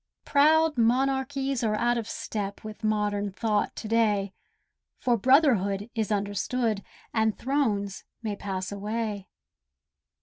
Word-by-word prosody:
Proud 310 Hz, 0 st, +4 dB
monarchies 265 Hz, +2 st, +1 dB
are 215 Hz, -1 st, +1 dB
out 240 Hz, +2 st, +2 dB
of 230 Hz, -2 st, -3 dB
step 200 Hz, -2 st, -4 dB
With 215 Hz, +1 st, -9 dB
modern 205 Hz, -1 st, 0 dB
thought 210 Hz, +1 st, 0 dB
to -, -, -6 dB
day, 210 Hz, -3 st, +2 dB, 0.7 s
For 245 Hz, -2 st, +2 dB
Brotherhood 230 Hz, -, +3 dB
is 225 Hz, -2 st, -1 dB
understood, 205 Hz, +2 st, -1 dB, 0.3 s
And 220 Hz, -1 st, +1 dB
thrones 220 Hz, -8 st, -1 dB, 0.2 s
may 215 Hz, -2 st, -2 dB
pass 190 Hz, -2 st, -4 dB
away. 210 Hz, 0 st, -3 dB
220 Hz, 115 wpm, -27 LUFS, 205-250 Hz, 0.7 s, Proud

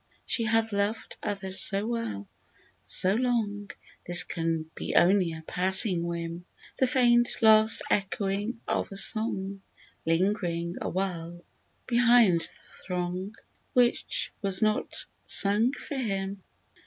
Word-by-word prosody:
She 230 Hz, -, 0 dB
hath 225 Hz, 0 st, 0 dB
loved 200 Hz, +2 st, -3 dB
others 195 Hz, -2 st, -2 dB
so 200 Hz, +1 st, +4 dB
well, 225 Hz, -, -4 dB, 0.6 s
so 185 Hz, +1 st, +1 dB
long, 215 Hz, -4 st, -1 dB, 0.4 s
This 175 Hz, 0 st, +9 dB
can 165 Hz, -2 st, -3 dB
be -, -, -5 dB
only 180 Hz, -1 st, +3 dB
a 160 Hz, 0 st, -9 dB
passing 185 Hz, 0 st, +2 dB
whim," 170 Hz, 0 st, -5 dB, 0.3 s
The 260 Hz, -, +3 dB
faint 240 Hz, -1 st, +3 dB
last 220 Hz, 0 st, +5 dB
echoing 205 Hz, +3 st, -2 dB
of -, -, -2 dB
a -, -, -8 dB
song 195 Hz, -2 st, +1 dB, 0.5 s
Ling'ring 170 Hz, -1 st, -1 dB
awhile 175 Hz, -2 st, -4 dB, 0.4 s
behind 235 Hz, -7 st, +4 dB
the -, -, +2 dB, 0.4 s
throng, 180 Hz, +3 st, -4 dB, 0.4 s
Which 245 Hz, -1 st, +1 dB
was 195 Hz, -2 st, 0 dB
not 215 Hz, 0 st, -1 dB, 0.2 s
sung 210 Hz, +5 st, +2 dB
for 285 Hz, 0 st, -7 dB
him 195 Hz, -5 st, -3 dB
195 Hz, 115 wpm, -27 LUFS, 180-225 Hz, 0.6 s, This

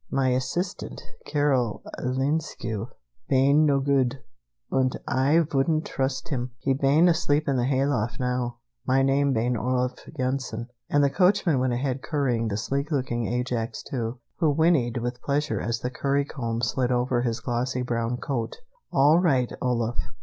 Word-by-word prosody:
My 135 Hz, -1 st, +1 dB
assistant, 160 Hz, +9 st, -2 dB, 0.3 s
Carol 135 Hz, -7 st, +1 dB, 0.2 s
Linescu, 130 Hz, -4 st, -1 dB, 0.4 s
bane 140 Hz, +4 st, +4 dB
no 140 Hz, -1 st, +3 dB
good, 135 Hz, -2 st, +1 dB, 0.5 s
und 130 Hz, -1 st, +1 dB
Ay 145 Hz, +6 st, +3 dB
vouldn't 155 Hz, +3 st, +1 dB
trust 130 Hz, +2 st, -2 dB
him. 125 Hz, -4 st, -2 dB
He 135 Hz, +2 st, 0 dB
bane 140 Hz, +5 st, +4 dB
asleep 155 Hz, -3 st, +2 dB
up -, -, -3 dB
in 135 Hz, -, +1 dB
the 120 Hz, -, +1 dB
hayloft 130 Hz, -3 st, 0 dB
now. 125 Hz, -1 st, -1 dB, 0.3 s
My 135 Hz, +1 st, +2 dB
name 140 Hz, +1 st, +3 dB
bane 120 Hz, 0 st, +1 dB
Olaf 125 Hz, +2 st, -1 dB, 0.2 s
Yensen." 130 Hz, -3 st, -2 dB, 0.2 s
And 145 Hz, 0 st, +3 dB
the 140 Hz, -, +3 dB
coachman 180 Hz, -5 st, +3 dB
went 125 Hz, -1 st, +1 dB
ahead 130 Hz, +1 st, -1 dB
currying 125 Hz, -7 st, 0 dB
the 100 Hz, -2 st, -2 dB
sleek 140 Hz, +6 st, -2 dB
looking 125 Hz, -6 st, -1 dB
Ajax 120 Hz, -1 st, -2 dB
II, 115 Hz, -3 st, -1 dB, 0.2 s
who 160 Hz, -3 st, +2 dB
whinnied 145 Hz, -6 st, +2 dB
with 120 Hz, +1 st, -3 dB
pleasure 145 Hz, +1 st, -1 dB
as 115 Hz, -1 st, -2 dB
the 125 Hz, -, -2 dB
currycomb 135 Hz, -4 st, -1 dB
slid 125 Hz, +2 st, +1 dB
over 125 Hz, 0 st, +1 dB
his 120 Hz, -1 st, -1 dB
glossy 125 Hz, +1 st, -1 dB
brown 120 Hz, 0 st, -1 dB
coat. 125 Hz, -3 st, -3 dB, 0.4 s
"All 145 Hz, +5 st, +5 dB
right, 135 Hz, -9 st, +2 dB
Olaf. 120 Hz, -2 st, -1 dB
130 Hz, 155 wpm, -26 LUFS, 120-140 Hz, 0.5 s, All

